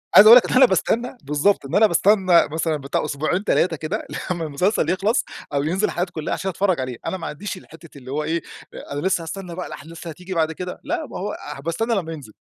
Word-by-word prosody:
عايز 210 - +10
أقول 235 +3 +12
لك - - +4
إن - - -4
إن - - +3
أنا 260 - +9
باستنى 235 +5 0
بالضبط، 150 +6 +1
إن 135 - -4
أنا 215 +1 +6
باستنى 185 -1 +4
مثلًا 160 0 0
بتاع 140 0 -2
أسبوعين 155 +7 -1
3 175 -5 +2
كده 160 +9 -4 0.2
لمّا 170 -2 -2
المسلسل 160 +3 0
يخلص 200 +6 +1 0.3
أو 140 0 +1
ينزل 185 +7 0
حلقاته 180 +1 -2
كلها 155 - -3
عشان 190 - -2
أتفرج 185 -2 0
عليه، 130 -2 -4
أنا 190 - -2
ما 180 - -6
عنديش 195 +6 -5
الحتة 165 -4 -14
اللي 130 0 -10
هو 150 +2 -1
إيه 165 +2 -1 0.3
أ - - -8
أنا 145 - -3
لسه 185 -2 +1
هاستنى 180 +1 -6
بقى 180 - -5
الأحداث 160 +3 -10
اللي 165 - -5
هتيجي 180 +3 -8
بعد 160 -2 +1
كده، 180 +3 -6
لأ 320 +2 -2
ما - - -7
هو 205 +3 -4 0.2
هابقى 140 +4 -5
استنى 225 +8 -1
لمّا 165 -5 -2
ينزل. 135 -9 -10
175 Hz, 240 wpm, -22 LUFS, 155-200 Hz, 0.3 s, أقول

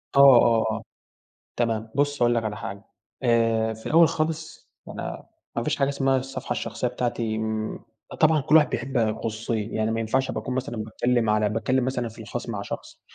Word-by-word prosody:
آه، - - +5
آه، 120 -4 +7
آه، 110 +1 -4 0.7
تمام، 115 -2 -1
بُصّ 145 -1 +1
هاقول 120 0 +4
لك 115 -1 0
على 105 -1 -3
حاجة، 100 -1 -7 0.4
آآ، 115 -2 +2
في 110 - -13
الأول 165 +1 +6
خالص 160 0 -3 0.2
أنا - - -6 0.3
ما 115 - 0
فيش - - 0
حاجة 140 -1 +1
اسمها 135 -1 +1
الصفحة 135 +1 -4
الشخصية - - -2
بتاعتي 115 -3 -2
آمم، 110 0 -2 0.4
طبعًا 155 -1 +5
كُلّ 150 +3 +4
واحد 150 - +5
بيحب 135 -1 -3
الخصوصية، 110 -1 -1
يعني 110 0 0
ما 115 0 -1
ينفعش 130 +4 0
أبقى - - -3
باكون 130 - -4
مثلًا 130 -1 -3
باتكلم 115 +1 0
على 105 0 +2
باتكلم 120 +4 0
مثلًا 125 -2 -1
في 115 +1 -11
الخاص 120 +3 -6
مع 105 -4 -3
شخص، - - -8
115 Hz, 185 wpm, -25 LUFS, 110-135 Hz, 0.7 s, آه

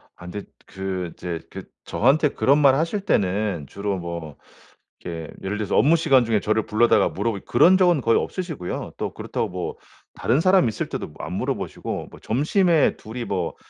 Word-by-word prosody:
아 - - -22
근데 100 +3 -6 0.2
그 95 -2 -4
이제 85 -2 -5
그 - - -8 0.2
저한테 145 +5 +3
그런 140 +1 +3
말 140 -3 +6
하실 165 +7 -1
때는 100 - 0
주로 100 +3 -3
뭐 85 -4 -6 0.6
이게 85 -2 -6 0.2
예를 100 +2 -2
들어서 105 -2 -1
업무 145 +9 +5
시간 140 -7 +4
중에 110 -2 +2
저를 110 +1 0
불러다가 110 -2 +3
물어보고 100 0 -3
그런 175 +10 +5
적은 175 -6 +3
거의 115 -1 +3
없으시고요. 160 - -5
또 - - -3
그렇다고 - - -3
뭐 90 -1 -4 0.4
다른 125 +5 +1
사람 185 -4 +4
있을 110 - -4
때도 - - -4
뭐 - - -17
안 - - -6
물어보시고 - - -3
뭐 - - -14
점심에 160 - +2
둘이 115 +2 -7
뭐 90 -5 -2
110 Hz, 360 characters per minute, -23 LUFS, 95-150 Hz, 0.6 s, 말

